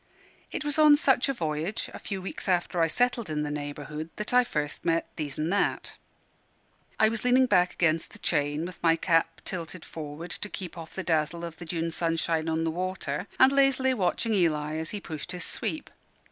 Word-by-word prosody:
It -, -, -4 dB
was 295 Hz, +1 st, 0 dB
on 300 Hz, -1 st, +8 dB
such 270 Hz, -2 st, +3 dB
a -, -, +2 dB
voyage, 160 Hz, -, -2 dB
a -, -, -7 dB
few 195 Hz, -3 st, -5 dB
weeks 195 Hz, -, -6 dB
after 175 Hz, -1 st, +1 dB
I 165 Hz, -, +5 dB
settled 245 Hz, +1 st, +1 dB
in 150 Hz, -1 st, -1 dB
the 145 Hz, -, -3 dB
neighbourhood, 150 Hz, +1 st, -5 dB
that 210 Hz, +3 st, -3 dB
I 250 Hz, 0 st, +7 dB
first 150 Hz, -10 st, -3 dB
met 165 Hz, -1 st, +1 dB
These 145 Hz, -3 st, -4 dB
an' 155 Hz, +2 st, -1 dB
That. 200 Hz, +2 st, 0 dB, 1.0 s
I 220 Hz, -, +6 dB
was 225 Hz, 0 st, -2 dB
leaning 250 Hz, +1 st, +5 dB
back 180 Hz, -7 st, +3 dB
against 160 Hz, -2 st, +1 dB
the -, -, -12 dB
chain, 145 Hz, 0 st, 0 dB
with 180 Hz, 0 st, -9 dB
my 165 Hz, -1 st, +5 dB
cap 165 Hz, 0 st, +1 dB
tilted 175 Hz, -1 st, -5 dB
forward 155 Hz, +2 st, -7 dB
to 210 Hz, -, -4 dB
keep 180 Hz, -4 st, -6 dB
off 165 Hz, -1 st, -9 dB
the 190 Hz, -, -3 dB
dazzle 160 Hz, 0 st, 0 dB
of 165 Hz, -1 st, -8 dB
the 175 Hz, -, -8 dB
June 165 Hz, 0 st, -2 dB
sunshine 165 Hz, -1 st, 0 dB
on 160 Hz, 0 st, 0 dB
the 165 Hz, -, 0 dB
water, 180 Hz, -2 st, -3 dB
and 260 Hz, +1 st, +8 dB
lazily 270 Hz, -1 st, +3 dB
watching 220 Hz, +1 st, 0 dB
Eli 155 Hz, -5 st, +1 dB
as 160 Hz, 0 st, -4 dB
he 210 Hz, -, -4 dB
pushed 160 Hz, -4 st, -6 dB
his 180 Hz, -, -3 dB
sweep. 310 Hz, -, -4 dB
170 Hz, 200 wpm, -28 LUFS, 160-210 Hz, 1.0 s, on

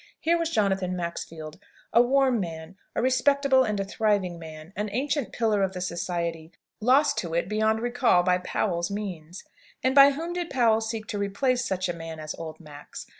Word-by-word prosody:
Here 335 Hz, +1 st, +2 dB
was 335 Hz, -1 st, 0 dB
Jonathan 195 Hz, -, 0 dB
Maxfield, 165 Hz, -3 st, -6 dB, 0.3 s
a 235 Hz, -, +7 dB
warm 260 Hz, -1 st, +3 dB
man, 165 Hz, -1 st, -6 dB, 0.2 s
a -, -, 0 dB
respectable 265 Hz, +1 st, +3 dB
and 210 Hz, -4 st, -1 dB
a 195 Hz, -, -1 dB
thriving 200 Hz, -4 st, 0 dB
man, 160 Hz, +2 st, -10 dB
an 210 Hz, +1 st, -2 dB
ancient 275 Hz, +3 st, -1 dB
pillar 220 Hz, -3 st, +1 dB
of 190 Hz, -1 st, 0 dB
the 180 Hz, -, -5 dB
Society, 170 Hz, -2 st, -3 dB, 0.3 s
lost 260 Hz, +6 st, +3 dB
to 165 Hz, -2 st, -4 dB
it 170 Hz, -, 0 dB
beyond 220 Hz, +2 st, +1 dB
recall 240 Hz, -6 st, +3 dB
by 180 Hz, 0 st, +2 dB
Powell's 175 Hz, -1 st, -1 dB
means! 185 Hz, -4 st, -6 dB, 0.4 s
And 260 Hz, 0 st, +2 dB
by 275 Hz, 0 st, +9 dB
whom 330 Hz, +5 st, -4 dB
did 350 Hz, -1 st, -3 dB
Powell 230 Hz, -4 st, +3 dB
seek 220 Hz, -1 st, -4 dB
to 205 Hz, -, -3 dB
replace 245 Hz, +6 st, 0 dB
such 185 Hz, -6 st, -1 dB
a 175 Hz, -, -2 dB
man 165 Hz, -1 st, -8 dB
as 155 Hz, 0 st, -5 dB
old 160 Hz, -1 st, -7 dB
Max? 150 Hz, -3 st, -10 dB
200 Hz, 185 wpm, -26 LUFS, 170-250 Hz, 0.4 s, by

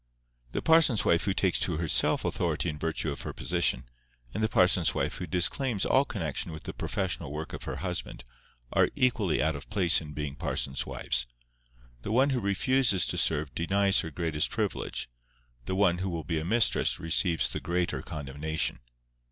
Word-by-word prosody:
The -, -, -3 dB
parson's 160 Hz, -9 st, +4 dB
wife 85 Hz, -, +3 dB
who 100 Hz, -, +1 dB
takes 95 Hz, -3 st, +2 dB
to 85 Hz, -4 st, 0 dB
herself 80 Hz, -3 st, +2 dB
authority -, -, -1 dB
in 75 Hz, -1 st, -6 dB
virtue 80 Hz, -1 st, -2 dB
of 70 Hz, -, -6 dB
her -, -, -6 dB
position, 85 Hz, -7 st, 0 dB, 0.5 s
and 110 Hz, -, -3 dB
the 110 Hz, -, +1 dB
parson's 90 Hz, -3 st, +3 dB
wife -, -, -1 dB
who 90 Hz, -, -5 dB
disclaims 100 Hz, -, +1 dB
all 135 Hz, +2 st, +3 dB
connexion 80 Hz, -, -3 dB
with 80 Hz, -1 st, -9 dB
the -, -, -6 dB
professional 90 Hz, -7 st, -3 dB
work 75 Hz, +2 st, -6 dB
of -, -, -7 dB
her -, -, -4 dB
husband, -, -, -4 dB, 0.5 s
are -, -, +4 dB
equally 115 Hz, -12 st, +1 dB
out 80 Hz, 0 st, 0 dB
of 70 Hz, -, -9 dB
place 90 Hz, -6 st, +3 dB
in 75 Hz, -2 st, -9 dB
being 75 Hz, -1 st, -4 dB
parsons' 70 Hz, -1 st, -2 dB
wives. -, -, -2 dB, 0.7 s
The 100 Hz, -, -5 dB
one 130 Hz, +5 st, +3 dB
who 130 Hz, -, 0 dB
refuses 100 Hz, 0 st, +2 dB
to -, -, -1 dB
serve 75 Hz, -3 st, +1 dB
denies 100 Hz, +5 st, +2 dB
her 80 Hz, -, -2 dB
greatest 80 Hz, -1 st, -1 dB
privilege; -, -, -2 dB, 0.6 s
the 95 Hz, -, -1 dB
one 95 Hz, -3 st, +3 dB
who 95 Hz, +1 st, -2 dB
will 85 Hz, -2 st, -4 dB
be 80 Hz, +2 st, -2 dB
a -, -, -4 dB
mistress 110 Hz, +4 st, +2 dB
receives 85 Hz, +1 st, +2 dB
the -, -, -3 dB
greater 90 Hz, 0 st, -1 dB
condemnation. 75 Hz, 0 st, -2 dB
85 Hz, 180 wpm, -28 LUFS, 80-100 Hz, 0.7 s, parson's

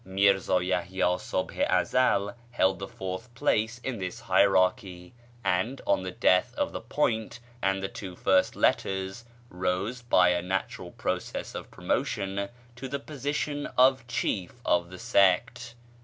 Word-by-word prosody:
Mírzá 95 Hz, -2 st, +2 dB
Yahyá 90 Hz, 0 st, 0 dB
Subh 95 Hz, -, -3 dB
i -, -, +4 dB, 0.2 s
Ezel 120 Hz, -5 st, +1 dB, 0.2 s
held 95 Hz, -6 st, +1 dB
the 95 Hz, -, -5 dB
fourth 95 Hz, +5 st, -6 dB
place 120 Hz, -3 st, +1 dB
in 125 Hz, -5 st, -3 dB
this 90 Hz, -1 st, -5 dB
hierarchy, 95 Hz, -1 st, +2 dB, 0.3 s
and, 115 Hz, +9 st, 0 dB
on 95 Hz, -1 st, +2 dB
the 95 Hz, -, -4 dB
death 90 Hz, 0 st, +2 dB
of -, -, -1 dB
the -, -, -5 dB
"Point" 110 Hz, +1 st, -1 dB, 0.2 s
and 95 Hz, 0 st, 0 dB
the -, -, 0 dB
two 100 Hz, -5 st, -8 dB
first 95 Hz, +1 st, +2 dB
"Letters," 95 Hz, +4 st, 0 dB, 0.3 s
rose, 90 Hz, +7 st, -2 dB
by 95 Hz, -7 st, +4 dB
a 90 Hz, 0 st, +1 dB
natural 95 Hz, +2 st, -3 dB
process -, -, -4 dB
of -, -, -7 dB
promotion, 100 Hz, 0 st, -2 dB, 0.3 s
to 130 Hz, +2 st, -5 dB
the 140 Hz, +2 st, -2 dB
position 145 Hz, +1 st, -3 dB
of 130 Hz, -1 st, +4 dB
chief 100 Hz, -6 st, -2 dB
of 85 Hz, 0 st, +2 dB
the 90 Hz, -, -9 dB
sect1. 115 Hz, +3 st, +2 dB
95 Hz, 145 wpm, -28 LUFS, 95-120 Hz, 0.3 s, i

